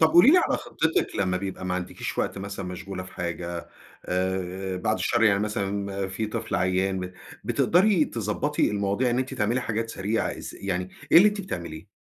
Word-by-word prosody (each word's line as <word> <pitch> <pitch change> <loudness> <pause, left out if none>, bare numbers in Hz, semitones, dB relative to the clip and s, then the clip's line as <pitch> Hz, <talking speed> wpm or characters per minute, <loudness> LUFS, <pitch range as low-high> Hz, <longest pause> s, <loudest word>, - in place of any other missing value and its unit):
طب 160 - +7
قولي 175 +10 +8
لي 360 - +7
على - - +2
خطِّتِك 160 0 -1
لمّا 90 -2 +1
بيبقى 95 0 -4
ما 90 0 -1
عندكيش 90 0 -4
وقت - - -1
مثلًا 100 0 -5
مشغولة 90 +1 -5
في 90 - -11
حاجة، 85 0 -4 0.4
آآ 95 +1 -2
بعد 110 +4 0
الشر 120 -1 +1
يعني 105 -3 +5
مثلًا 100 -1 -2
في 100 +4 -2
طفل 115 +1 -4
عيّان 95 +1 +1
ب 90 0 -5 0.3
بتقدري 180 -1 +4
تضبّطي 115 +7 0
المواضيع 100 +4 +1
إن 120 - +1
أنتِ 130 +1 -2
تعملي 120 +1 +1
حاجات 115 -1 -2
سريعة 105 +3 -1
إز - - -7
يعني 90 -1 -2 0.2
إيه - - +11
اللي 210 - +8
أنتِ 205 0 -3
بتعمليه؟ 85 - -6
100 Hz, 185 wpm, -26 LUFS, 90-115 Hz, 0.4 s, إيه